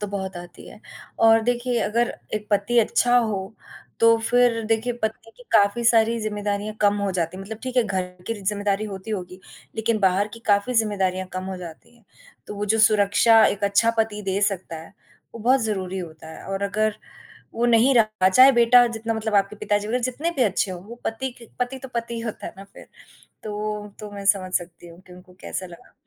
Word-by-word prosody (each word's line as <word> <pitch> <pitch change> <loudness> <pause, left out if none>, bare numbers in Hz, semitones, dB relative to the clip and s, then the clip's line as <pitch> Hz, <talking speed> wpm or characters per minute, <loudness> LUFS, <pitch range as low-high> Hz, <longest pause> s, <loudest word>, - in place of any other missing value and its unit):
तो 205 - -3
बहुत 190 -2 -4
आती 175 0 -11
है - - -14 0.5
और 225 0 +6
देखिए 245 +1 0
अगर 235 +3 0 0.2
एक 210 0 -4
पति 205 +4 +2
अच्छा 245 +2 +3
हो, 205 -3 -2 0.5
तो 230 0 +6
फिर 235 0 +2
देखिए 225 +2 0
पत्नी 220 +1 -3
की - - -15
काफ़ी 205 +4 +3
सारी 230 0 +4
ज़िम्मेदारियाँ 210 0 -3
कम 205 -1 +4
हो 200 - 0
जाती 170 +2 -2
हैं, 195 - -7
मतलब 220 +2 -8
ठीक 255 0 -5
है, 250 - +5
घर 190 -3 -1 0.2
की 230 - -2
ज़िम्मेदारी 205 +1 -1
होती 190 +3 -8
होगी 185 -2 -5 0.4
लेकिन 220 0 0
बाहर 195 +1 +2
की 230 - -13
काफ़ी 205 +4 +2
ज़िम्मेदारियाँ 195 -4 0
कम 185 0 -4
हो 190 -1 -5
जाती 180 +7 -11
हैं, 230 - -27 0.4
तो - - -7
वो 205 0 -3
जो - - 0
सुरक्षा 215 +1 +5
एक 205 0 -1
अच्छा 200 +3 +3
पति 215 -1 0
दे 195 0 -1
सकता 180 -3 -7
है, 165 - -14 0.4
वो 230 - -8
बहुत 255 +4 +3
ज़रूरी 190 -3 -3
होता 160 -2 -9
है - - -11
और 195 +1 -3
अगर 215 +1 0 0.6
वो 235 +1 +1
नहीं 240 +3 +4
रहा 215 -4 +3
चाहे 255 +8 +7
बेटा 240 0 +6
जितना 225 0 -3
मतलब 220 -1 -3
आपके 200 +1 +2
पिताजी 205 0 -1
वग़ैरह 245 +3 -1
जितने 270 +7 -2
भी 260 - +3
अच्छे 200 -3 0
हों, 180 -1 -6
वो 225 +4 -10
पति 255 +4 -3
के 235 - -14
पति 250 +2 -2
तो 265 - -9
पति 235 0 -3
ही 230 - -4
होता 225 -2 -6
है - - -8
ना 195 - -10
फिर, 195 - -15 0.6
तो 210 0 -4
तो 210 -1 -8
मैं 200 -1 -7
समझ 190 -2 +2
सकती 175 -1 -4
हूँ 170 +1 -15
कि 180 - -14
उनको 180 0 -16
कैसा 185 - -5
लगा। 170 -1 -15
210 Hz, 210 wpm, -23 LUFS, 195-230 Hz, 0.6 s, चाहे